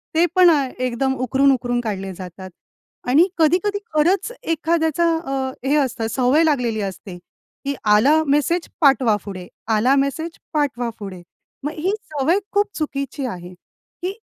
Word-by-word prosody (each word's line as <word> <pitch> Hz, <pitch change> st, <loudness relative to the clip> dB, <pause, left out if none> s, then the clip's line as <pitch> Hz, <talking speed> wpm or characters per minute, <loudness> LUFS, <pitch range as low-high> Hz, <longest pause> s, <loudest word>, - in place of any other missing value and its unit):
ते 335 Hz, +2 st, +5 dB
पण 365 Hz, -1 st, +7 dB
अ, 305 Hz, -4 st, +4 dB, 0.2 s
एकदम 255 Hz, +1 st, 0 dB
उकरून-उकरून 255 Hz, -1 st, +1 dB
काढले 195 Hz, -4 st, -4 dB
जातात. 185 Hz, +1 st, -9 dB, 0.6 s
आणि 310 Hz, +8 st, +5 dB
कधी-कधी 360 Hz, +6 st, +2 dB
खरंच 345 Hz, +9 st, +2 dB, 0.2 s
एखाद्याचा 320 Hz, 0 st, 0 dB
अ, 270 Hz, -5 st, -3 dB, 0.2 s
हे 285 Hz, -, +3 dB
असतं, 250 Hz, -6 st, 0 dB
सवय 260 Hz, +6 st, +3 dB
लागलेली 250 Hz, -8 st, +1 dB
असते, 190 Hz, -1 st, -6 dB, 0.5 s
की 280 Hz, -, 0 dB
आला 260 Hz, +10 st, +5 dB
मेसेज, 295 Hz, +5 st, +1 dB
पाठवा 265 Hz, -6 st, +4 dB
पुढे. 185 Hz, -3 st, -7 dB, 0.2 s
आला 225 Hz, +4 st, +3 dB
मेसेज, 280 Hz, +4 st, 0 dB, 0.2 s
पाठवा 265 Hz, -6 st, 0 dB
पुढे. 195 Hz, -3 st, -8 dB, 0.4 s
मग 295 Hz, -, -2 dB
ही 350 Hz, +5 st, 0 dB, 0.2 s
सवय 300 Hz, +7 st, +2 dB
खूप 410 Hz, +1 st, +2 dB
चुकीची 275 Hz, -3 st, -3 dB
आहे, 180 Hz, -6 st, -6 dB
की 360 Hz, -, -9 dB
275 Hz, 140 wpm, -21 LUFS, 230-315 Hz, 0.6 s, पण